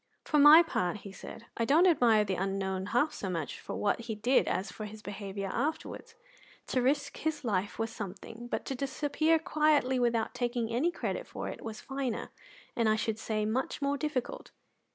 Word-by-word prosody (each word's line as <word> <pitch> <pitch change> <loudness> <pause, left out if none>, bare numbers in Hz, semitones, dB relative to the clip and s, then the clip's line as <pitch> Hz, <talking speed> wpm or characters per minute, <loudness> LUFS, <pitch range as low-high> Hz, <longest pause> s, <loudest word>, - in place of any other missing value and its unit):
"For 300 - +2
my 300 +4 +10
part," 185 - -2
he 200 - -7
said, 225 +3 -10
"I 230 - +1
don't 300 +9 +5
admire 235 - +5
the 195 - -1
unknown 190 0 -2
half 245 +9 +1
so 195 - -4
much 165 -5 -3
for - - -6
what 205 - +1
he 230 -1 -5
did 240 +5 +2
as 190 +3 -1
for 215 - -7
his 210 +1 -10
behaviour 200 -1 -5
afterwards. 315 - -3 0.5
To 255 - +1
risk 285 +3 0
his 310 -2 -2
life 205 -4 -1
was 225 0 -2
something, 225 +2 -7
but - - -3
to - - -3
disappear 290 +4 +1
quietly 300 -5 +2
without 235 -2 +1
taking 240 -2 -2
any 275 +9 +2
credit - - -4
for - - -5
it - - -8
was 225 0 -6
finer 265 -4 -3 0.4
and 230 -2 +2
I 215 - +4
should 220 0 -2
say 215 -1 -1
much 235 +5 -1
more 280 0 0
difficult." 285 -4 -3
235 Hz, 190 wpm, -30 LUFS, 210-285 Hz, 0.5 s, my